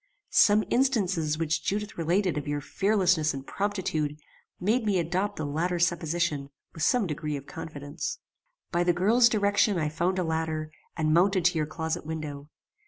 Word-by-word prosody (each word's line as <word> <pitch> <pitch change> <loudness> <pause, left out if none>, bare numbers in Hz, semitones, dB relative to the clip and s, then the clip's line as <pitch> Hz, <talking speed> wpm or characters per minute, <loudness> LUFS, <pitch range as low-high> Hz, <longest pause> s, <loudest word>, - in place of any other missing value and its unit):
Some 210 0 +5
instances 195 - +1
which 160 0 -1
Judith 210 +1 -2
related 175 +3 +1
of 150 0 -4
your 145 0 -1
fearlessness 180 -3 +1
and 135 0 -7
promptitude 175 -8 -2 0.4
made 220 +7 +1
me 205 -3 +1
adopt 180 +4 -1
the 155 - -3
latter 165 +5 -1
supposition 165 -4 0 0.2
with 160 - -9
some 245 - +3
degree 150 -2 -3
of 140 - -9
confidence. 160 - -6 0.5
"By 175 0 +2
the 175 0 +3
girl's 225 +7 +4
direction 205 -2 +2
I 155 -2 0
found 175 +4 -1
a 185 - +1
ladder, 160 -1 -2 0.3
and 155 -1 +1
mounted 185 +1 +3
to 180 0 +4
your 155 - 0
closet 160 +2 -3
window. 150 -2 -6
170 Hz, 165 wpm, -27 LUFS, 155-195 Hz, 0.5 s, Some